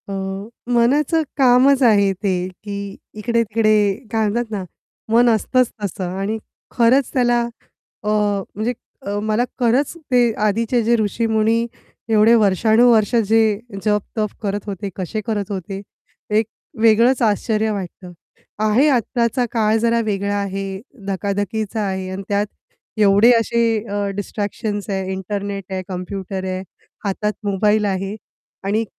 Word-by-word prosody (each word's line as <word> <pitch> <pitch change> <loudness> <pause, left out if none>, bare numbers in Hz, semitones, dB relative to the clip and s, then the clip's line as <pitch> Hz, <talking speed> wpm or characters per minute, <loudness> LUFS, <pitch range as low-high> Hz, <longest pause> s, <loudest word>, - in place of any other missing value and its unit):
अ, - - -3 0.6
मनाचं 280 +7 +3 0.2
कामच 265 +1 +5
आहे 205 -4 +5
ते, 185 -2 -1 0.2
की 200 -1 -5 0.2
इकडे-तिकडे 225 0 +1 0.4
काय 220 -1 +1
म्हणतात 235 +1 -2
ना, 200 -3 -3 0.5
मन 240 +1 +6
असतंच 240 +3 +2
तसं 185 -2 -3
आणि 210 +3 -1 0.3
खरंच 245 +3 +3
त्याला 240 -2 +3 0.6
अ, 210 - -1 0.5
म्हणजे 220 +4 -1 0.5
मला 215 +2 +1 0.2
खरंच 250 +4 +2 0.2
ते 245 -2 +4
आधीचे 230 +3 +1
जे 235 +2 +3
ऋषीमुनी 220 +1 +1 0.4
एवढे 220 +1 +5
वर्षानुवर्षं 220 +2 +4
जे 220 -1 +3 0.3
जप-तप 210 +1 0
करत 205 -1 -3
होते, 200 0 -4
कसे 195 +4 -3
करत 205 -3 -2
होते. 195 0 -5 0.5
एक 215 +1 +2 0.4
वेगळंच 230 +4 +4
आश्चर्य 220 0 +1
वाटतं. 185 -2 -6 0.5
आहे. 215 +7 +3
आत्ताचा 245 -1 +1
काळ 220 -1 +2
जरा 235 +1 +2
वेगळा 200 -1 -1
आहे, 195 -1 -4 0.3
धकाधकीचा 205 +2 -2
आहे 190 -2 -2
आणि 190 +1 -5
त्यात 205 +1 +1 0.5
एवढे 205 +3 +6
असे 235 +1 0 0.3
अ, 205 0 -1
डिस्ट्रॅक्शन्स 205 +1 -4
आहे, 190 -1 -2
इंटरनेट 200 +1 -4
आहे, 190 0 -2
कम्प्युटर 190 +1 -5
आहे, 185 0 -3 0.4
हातात 210 +2 -1
मोबाईल 210 +1 +2
आहे 195 +1 -2 0.5
आणि 210 +3 +1
215 Hz, 125 wpm, -20 LUFS, 200-230 Hz, 0.6 s, मन